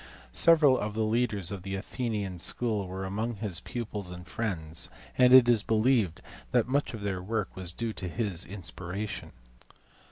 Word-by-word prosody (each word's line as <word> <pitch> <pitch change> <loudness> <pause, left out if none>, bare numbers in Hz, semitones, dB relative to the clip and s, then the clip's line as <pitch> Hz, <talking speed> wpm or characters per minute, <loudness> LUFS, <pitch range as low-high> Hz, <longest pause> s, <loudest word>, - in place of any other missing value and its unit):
Several 155 -6 +6
of 105 0 -3
the 110 - +1
leaders 110 -5 0
of 100 -2 -5
the 95 +1 -4
Athenian 105 -3 -3
school 105 -1 0
were 95 +1 -5
among 110 +5 -2
his 100 -5 0
pupils 105 -6 -5
and 90 0 -9
friends, 85 -6 -3 0.3
and 125 -1 +5
it 130 -1 +9
is 120 -3 +5
believed 110 -5 +2 0.3
that - - +3
much 140 -1 0
of 110 - -8
their 95 -2 -2
work 105 +1 -3
was 90 -2 -5
due 115 +4 -3
to 90 - -4
his 100 -4 -1
inspiration. 95 +1 -5
105 Hz, 165 wpm, -29 LUFS, 95-115 Hz, 0.3 s, it